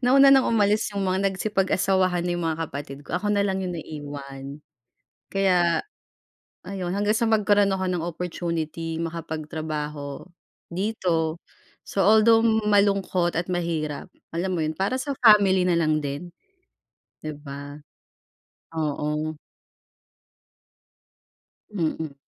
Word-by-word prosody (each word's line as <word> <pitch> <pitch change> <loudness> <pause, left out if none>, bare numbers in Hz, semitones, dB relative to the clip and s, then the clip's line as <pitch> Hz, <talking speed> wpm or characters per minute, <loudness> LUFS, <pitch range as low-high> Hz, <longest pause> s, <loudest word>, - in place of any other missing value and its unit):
Nauna 275 +2 +7
ng 270 -1 +6
umalis 210 -1 +3
yung 200 - -1
mga 190 +1 +1
nagsipag-asawahan 190 -2 +1
na 175 - 0
yung 175 -1 -2
mga 160 0 -2
kapatid 140 0 -7
ko, 165 - -3
ako 210 +2 -1
nalang 195 -1 +1
yung 180 - -3
naiwan. 145 -2 -8 0.7
Kaya 180 -3 +3 0.8
ayun, 180 -2 -4
hanggang 205 +2 +2
sa 230 - +1
magkaroon 205 -2 +3
ako 190 0 -1
ng 175 -2 -1
opportunity 165 -1 -3
makapagtrabaho 155 -3 -5 0.5
dito. 175 -4 -1 0.4
So, 195 -2 0
although 220 +2 +6
malungkot 200 -5 +2
at 170 +2 -2
mahirap, 165 -4 -2 0.2
alam 180 +3 -2
mo 165 - 0
yun, 155 0 -1
para 195 +7 0
sa 280 +2 -2
family 200 -5 +6
na 180 - +3
lang 155 -2 +2
din. 145 +4 -5 0.9
Di 155 - -4
ba? 145 0 -9 1.0
Oo. 150 0 -2 2.4
Mm. 160 -5 -2
175 Hz, 115 wpm, -25 LUFS, 155-200 Hz, 2.4 s, Nauna